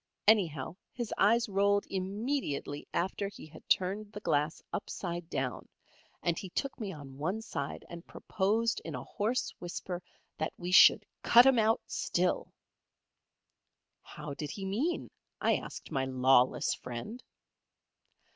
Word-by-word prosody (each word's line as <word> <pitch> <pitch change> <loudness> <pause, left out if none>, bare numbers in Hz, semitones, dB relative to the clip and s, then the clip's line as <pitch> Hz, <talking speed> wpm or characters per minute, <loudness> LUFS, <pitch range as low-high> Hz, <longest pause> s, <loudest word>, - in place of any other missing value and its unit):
Anyhow 175 -7 +3
his 240 -3 -4
eyes 230 +4 +4
rolled 200 0 +2
immediately 195 - -2
after 190 +3 -1
he 200 - -10
had 155 0 -15
turned 200 +3 +1
the 210 - -5
glass 150 -5 0
upside 175 -4 -4
down, 130 -5 -3 0.5
and 170 -1 +1
he 190 - -7
took 275 +10 -3
me 210 -4 -3
on 140 -5 -10
one 185 +8 -1
side 140 -10 -5
and 170 0 -10
proposed 220 +4 0
in 160 - -5
a 125 - -5
hoarse 230 +5 -1
whisper 175 0 -5 0.4
that 155 - -1
we 180 +1 -4
should - - +8 0.2
"Cut 240 +1 +8
'em 265 -3 +6
out 220 +1 +3
still." 180 +1 0 1.5
"How 145 - -8
did 150 +1 -5
he 195 +5 -5
mean?" 245 - -1 0.3
I - - +3
asked - - -8
my 135 -1 0
lawless 130 -1 +3
friend. 125 - -7
185 Hz, 135 wpm, -31 LUFS, 150-215 Hz, 1.5 s, should